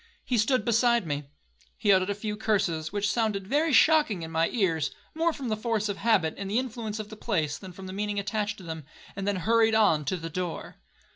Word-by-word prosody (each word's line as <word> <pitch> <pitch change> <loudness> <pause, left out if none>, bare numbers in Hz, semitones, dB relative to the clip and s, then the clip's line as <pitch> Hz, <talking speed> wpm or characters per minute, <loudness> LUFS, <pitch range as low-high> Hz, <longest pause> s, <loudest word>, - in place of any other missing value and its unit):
He 245 -3 +1
stood 250 +4 +2
beside 235 -2 +3
me. 145 -2 -3 0.5
He 210 -2 +3
uttered 185 +1 +2
a 200 - 0
few 210 +1 -4
curses, 175 -8 0
which 205 0 0
sounded 210 -4 0
very 295 +9 +1
shocking 290 - +4
in 160 - -6
my 165 +1 +2
ears, 180 - +1 0.2
more 330 +1 +1
from 275 -6 -5
the 215 - +1
force 215 -1 -1
of 200 - -2
habit, 200 -8 +2
and 195 0 -4
influence 230 -2 -2
of 215 -1 -6
the 215 - -8
place, 160 -10 -1
than 190 -2 -9
from 190 +2 -10
the 185 - -7
meaning 205 +1 -2
attached 210 +1 -2
to 190 - -12
them, 160 -2 -6 0.3
and 195 0 -4
then 205 - +1
hurried 225 +4 +3
on 200 -9 +4
to 185 - -1
the 165 -1 -6
door. 180 0 -4
205 Hz, 220 wpm, -27 LUFS, 185-225 Hz, 0.5 s, shocking